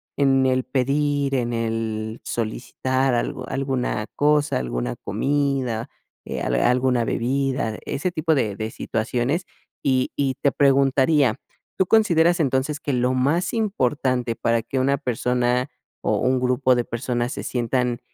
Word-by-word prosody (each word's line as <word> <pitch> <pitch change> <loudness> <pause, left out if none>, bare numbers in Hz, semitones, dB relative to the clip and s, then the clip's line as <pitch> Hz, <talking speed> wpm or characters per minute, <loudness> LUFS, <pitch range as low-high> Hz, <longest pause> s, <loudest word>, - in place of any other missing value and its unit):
en 135 -2 +3
el 130 0 +2
pedir, 140 +2 0
en 120 -2 0
el 115 -1 -3
solicitar 130 +3 -1
algo 125 +1 -2
alguna 130 -5 -1
cosa, 150 0 +2
alguna - - -3
comida, 135 -5 -1 0.3
eh, - - -5
al - - 0
alguna 125 0 +2
bebida, 130 -1 -1
ese 180 +6 -2
tipo 160 -1 +1
de 105 -7 0
de 110 +1 -4
situaciones. 125 +12 -1 0.4
Y 130 -2 +1
y 135 -2 0
te 140 - +3
preguntaría, 135 -1 +3 0.4
¿tú 190 - +3
consideras 175 -5 +4
entonces 140 +1 0
que 145 - -2
lo 125 +1 +1
más 140 +8 +1
importante 130 - 0
para 115 0 +1
que 130 - -5
una 140 +2 +2
persona 125 0 0 0.3
o - - +1
un 130 0 +2
grupo 125 0 +3
de 120 - +1
personas 120 +1 -2
se - - -5
sientan 125 0 -1
130 Hz, 140 wpm, -23 LUFS, 120-140 Hz, 0.4 s, consideras